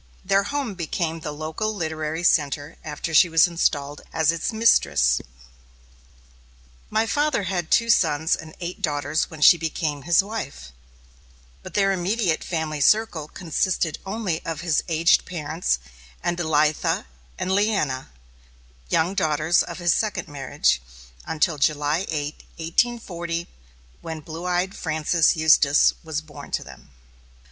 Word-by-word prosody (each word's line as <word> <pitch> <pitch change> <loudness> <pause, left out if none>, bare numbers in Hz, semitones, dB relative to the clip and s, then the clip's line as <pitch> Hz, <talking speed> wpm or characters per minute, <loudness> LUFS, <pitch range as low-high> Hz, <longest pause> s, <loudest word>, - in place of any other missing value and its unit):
Their 195 0 +3
home 280 -6 -2
became 165 -2 -3
the 155 -1 -5
local 160 +9 -3
literary 160 -2 -3
centre 145 -3 +1
after 155 +2 -5
she 175 +3 +6
was 165 -1 +6
installed 145 -4 -1
as 160 -1 +2
its 170 +5 -2
mistress. 70 - +3 1.7
My 220 +1 +1
father 290 -1 +1
had 180 -3 -2
two 230 0 +4
sons 160 -6 +2
and 155 0 -11
eight 175 +1 -6
daughters 145 0 -1
when 155 -2 -11
she 170 +3 +8
became 155 -2 -2
his 175 +4 +3
wife; 195 - -6 0.9
but - - -11
their 195 -1 +3
immediate 190 -2 0
family 160 -3 -3
circle 195 -4 +2
consisted 170 0 -1
only 195 -5 -3
of 165 -1 -4
his 165 -4 +1
aged 165 0 +3
parents, 160 - -1 0.5
and 175 - 0
Elitha 155 -2 +1 0.3
and 185 - -2
Leanna, 190 -10 0 0.8
young 170 +4 +2
daughters 155 -1 +2
of 170 - -5
his 175 -2 +2
second 215 -2 -1
marriage, 135 - 0 0.5
until 155 -1 0
July 150 +5 +1
8, 150 -1 -3 0.2
1840, 170 -2 -1 0.5
when 160 -1 -6
blue 165 +3 -8
eyed 180 +2 0
Frances 160 0 +1
Eustis 155 -2 +5
was 160 -1 -3
born 145 -2 -12
to - - -2
them. 65 0 -14
160 Hz, 135 wpm, -23 LUFS, 150-180 Hz, 1.7 s, she